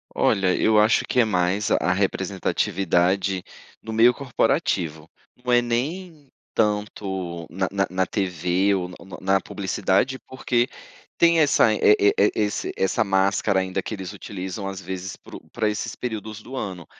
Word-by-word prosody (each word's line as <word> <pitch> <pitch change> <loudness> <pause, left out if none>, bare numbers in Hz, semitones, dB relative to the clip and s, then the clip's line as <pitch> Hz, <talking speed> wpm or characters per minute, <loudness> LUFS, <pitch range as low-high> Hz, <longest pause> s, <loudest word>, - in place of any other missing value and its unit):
Olha, 95 -2 +2
eu 110 -1 +3
acho 110 +2 +3
que - - 0
é - - +3
mais 95 0 0
a 90 - +2
representatividade 95 -1 0 0.4
no 110 - -7
meio 115 +2 +6
corporativo, 110 - -1 0.3
não 125 - -1
é 120 0 +5
nem 145 +6 -3 0.2
tanto 95 -5 -2
na 95 +1 -1
na 100 0 0
na 95 +1 0
TV 95 0 0
ou 90 -2 -3
na 90 - -10 0.3
na 95 0 +2
publicidade, 100 +7 0
porque 125 -2 0 0.5
tem 170 -1 +5
essa 140 -7 +4
e - - -2 0.2
e-e 100 0 +4
esse 105 -1 -1
essa 95 - +1
máscara 95 +1 +2
ainda 95 +1 -2
que 110 - -6
eles 95 -3 -7
utilizam 95 0 -6
às 95 -1 -5
vezes 95 0 -6
pro - - -12
pra 110 - 0
esses 110 +2 -4
períodos 110 -2 -5
do 130 - -9
ano. 95 -8 -5
100 Hz, 150 wpm, -23 LUFS, 95-110 Hz, 0.5 s, meio